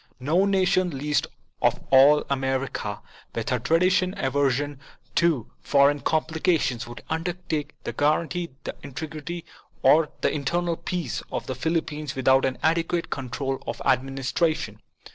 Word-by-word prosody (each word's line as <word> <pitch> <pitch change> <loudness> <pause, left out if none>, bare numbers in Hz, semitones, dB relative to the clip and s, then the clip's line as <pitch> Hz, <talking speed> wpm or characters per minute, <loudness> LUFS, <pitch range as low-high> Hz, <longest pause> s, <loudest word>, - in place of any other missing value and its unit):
No 160 +9 +2
nation, 185 -2 +2
least 150 +2 0 0.3
of - - +3
all 140 +3 +7
America, 130 -6 -2 0.3
with 115 +2 -2
her 125 -2 +1
traditional 180 - +2
aversion 140 +1 0 0.3
to 160 -9 +1
foreign 145 +1 +4
complications, 155 - 0
would 120 - -9
undertake 160 -2 -3
to - - -3
guarantee 170 +4 +1
the - - -5
integrity 155 +4 -6 0.4
or 155 -1 +5
the - - +2
internal 170 +4 0
peace 175 -6 -3
of - - -3
the 130 - -3
Philippines 150 0 -2
without 130 0 +4
an 130 - -1
adequate 165 +1 +1
control 135 +1 -3
of - - -3
the - - -5
administration. 135 - 0
150 Hz, 130 wpm, -25 LUFS, 135-165 Hz, 0.4 s, all